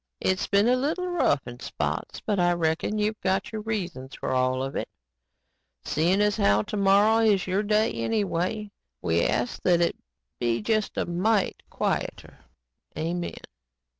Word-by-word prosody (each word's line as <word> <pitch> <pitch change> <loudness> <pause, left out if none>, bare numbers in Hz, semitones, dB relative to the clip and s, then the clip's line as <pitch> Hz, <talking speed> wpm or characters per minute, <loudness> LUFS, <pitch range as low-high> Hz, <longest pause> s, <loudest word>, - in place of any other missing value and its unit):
It's 185 0 0
been 200 +2 +3
a 250 - +5
little 310 +8 -1
rough 350 - +1
in - - -9
spots - - -4
but 205 -3 -1
I 175 0 +4
reckon 170 +5 0
You've 215 +1 -1
got 190 +1 0
Your 220 -1 -4
reasons 175 -12 -4
for - - -4
all 130 0 +1
of 135 - -5
it. - - -3 0.9
Seein' 175 +6 +2
as 210 -1 +2
how 100 +1 +3
tomorrow 205 +2 +3
is 205 -4 +3
Your 185 +2 +1
day 215 +1 +2
anyway, 200 - -1 0.3
we 85 -1 +2
ask 120 - -1
that 175 -2 +3
it 170 - +1 0.4
be 120 -1 +1
just 215 -1 -1
a - - +1
mite 190 +4 0
quieter. - - -3 0.6
Amen." 170 +2 -3
195 Hz, 155 wpm, -26 LUFS, 165-215 Hz, 0.9 s, a